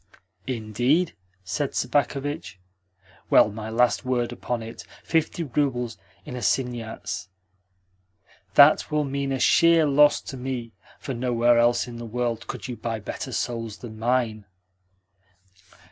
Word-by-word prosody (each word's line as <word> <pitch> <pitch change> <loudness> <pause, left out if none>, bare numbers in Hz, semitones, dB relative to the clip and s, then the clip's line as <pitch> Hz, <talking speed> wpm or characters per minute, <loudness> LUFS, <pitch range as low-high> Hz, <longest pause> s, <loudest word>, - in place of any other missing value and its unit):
"Indeed?" 125 - +1 0.3
said 105 +10 -3
Sobakevitch. 145 - -1 0.7
"Well, 105 - +6
my 110 +1 -6
last 120 +2 +2
word 125 -2 0
upon 120 -1 -4
it 115 +1 -9
is - - -17 0.2
fifty 165 +1 0
roubles 125 -5 -1 0.3
in 125 - -7
assignats. 120 -7 -2 1.3
That 145 +2 +7
will 150 -1 +1
mean 140 0 -2
a 135 - 0
sheer 165 +3 +5
loss 145 +1 +5
to 135 - -8
me, 125 -2 -4 0.3
for 135 - -5
nowhere 120 -1 +2
else 120 +1 +3
in 120 -1 -8
the 120 - -7
world 120 0 -2
could - - -6
you 125 - -5
buy 115 -1 -3
better 105 - -6
souls 115 -3 -3
than 110 -3 -10
mine." 115 -3 0
125 Hz, 130 wpm, -25 LUFS, 115-140 Hz, 1.3 s, That